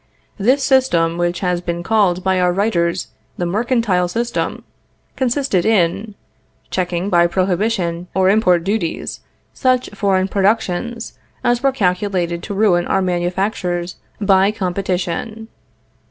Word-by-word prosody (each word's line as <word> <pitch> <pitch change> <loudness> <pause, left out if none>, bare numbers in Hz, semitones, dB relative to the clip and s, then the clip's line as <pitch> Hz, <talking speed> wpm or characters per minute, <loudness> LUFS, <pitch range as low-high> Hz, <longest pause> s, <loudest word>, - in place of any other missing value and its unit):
This 260 +7 +2
system, 175 -12 +2
which 175 0 -1
has 180 -2 0
been 170 -1 -4
called 190 -4 +2
by 190 -1 +1
our 180 0 +3
writers 180 -3 0 0.3
the 175 - -1
mercantile 210 -2 +1
system, 235 +6 -2 0.5
consisted 260 -7 0
in... 205 0 +1 0.6
checking 180 +1 -1
by 175 -1 +5
prohibition 180 -1 -1
or 190 -1 +3
import 185 -4 +3
duties 195 -3 -2 0.3
such 255 -2 +1
foreign 195 -2 +1
productions 215 +3 -1 0.2
as 240 0 +2
were 275 0 +3
calculated 180 -6 -1
to 200 - -6
ruin 190 -4 +2
our 190 - +1
manufactures 180 0 -2 0.2
by 195 -1 +4
competition.... 195 +3 -3
190 Hz, 120 wpm, -18 LUFS, 175-220 Hz, 0.6 s, by